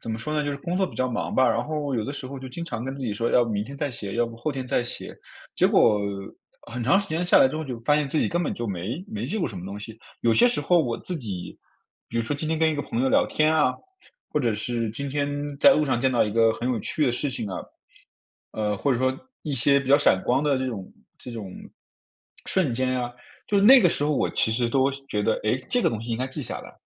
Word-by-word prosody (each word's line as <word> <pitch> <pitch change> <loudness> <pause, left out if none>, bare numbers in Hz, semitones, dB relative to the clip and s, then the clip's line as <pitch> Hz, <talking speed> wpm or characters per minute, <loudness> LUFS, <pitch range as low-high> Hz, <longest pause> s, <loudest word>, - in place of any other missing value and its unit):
怎 115 - -5
么 110 - -3
说 150 +7 -3
呢， 150 -1 +1
就 145 - -2
是 140 - -3
工 170 +5 -3
作 190 - +2
比 - - -11
较 130 - +1
忙 115 - -3
吧， 130 -1 +4
然 115 - +1
后 145 0 -3
有 115 - 0
的 135 - -4
时 145 -2 -5
候 135 +1 -7
就 130 - -8
经 170 +7 -6
常 120 -7 -5
跟 135 +1 -4
自 - - -9
己 110 - -1
说 115 +3 -1
要 120 - +4
明 105 -3 -1
天 140 +3 -9
再 145 0 -2
写， 100 -5 -5
要 120 0 +2
不 115 - -9
后 120 +7 -2
天 135 -3 -5
再 125 -1 +1
写， 120 - -6 0.4
结 - - +4
果 105 -1 +4 0.7
很 120 0 -4
长 140 +11 +4
时 200 - -3
间 165 +3 -1
下 - - +6
来 - - +7
之 130 - -4
后 160 - -3
就 125 -6 -5
发 135 +6 +3
现 150 -1 +1
自 155 - -3
己 - - +2
根 175 +1 0
本 - - -2
就 120 - -4
没 105 - -4
没 215 0 -5
记 - - -3
过 175 - 0
什 100 - -7
么 90 - -7
东 100 +1 -6
西。 110 +2 -8 0.2
有 115 - +4
些 245 - +6
时 240 - -1
候 175 -1 +3
我 120 -7 0
自 180 - -5
己， 100 - -6 0.5
比 115 - -5
如 115 - +2
说 130 +5 -2
今 155 +2 -4
天 160 - 0
跟 160 0 +3
一 - - -1
个 145 - -2
朋 115 - -3
友 135 - +2
聊 - - +3
天 155 +1 +2
啊， 150 -5 +3 0.6
或 150 - +1
者 115 -5 +1
是 115 +1 -2
今 140 +6 -5
天 145 0 -1 0.3
在 280 - +8
路 155 - +2
上 130 -3 +1
见 130 +1 +2
到 120 - +4
一 105 - -2
个 115 0 +4
很 120 +2 -3
有 120 - 0
趣 155 - -1
的 - - +3
事 145 +4 0
情 125 -5 -4
啊， 95 - -4 1.0
呃， 105 -1 -1
或 140 +7 +1
者 120 - 0
说 130 +1 +1 0.3
一 150 - -4
些 140 +2 +3
比 135 - -7
较 140 - +7
闪 95 -10 +3
光 130 +3 +2
的 145 -2 +2
这 130 - -2
种 105 -7 -6 0.3
这 - - -9
种 105 -5 -6 1.0
瞬 180 -9 +1
间 130 +1 0
啊， 120 -1 -2 0.4
就 205 - +3
是 195 - +3
那 260 +4 +9
个 180 - +5
时 145 - -1
候 150 0 +1
我 - - +1
其 110 - +2
实 120 +1 +1
都 135 +2 +2 0.2
觉 105 - -1
得， - - +2
哎， 115 +5 +1
这 245 - +1
个 - - +4
东 110 - -4
西 120 - -6
应 115 - 0
该 130 - 0
记 135 +3 -5
下 - - -5
来。 - - -12
130 Hz, 315 characters per minute, -25 LUFS, 115-150 Hz, 1.0 s, 那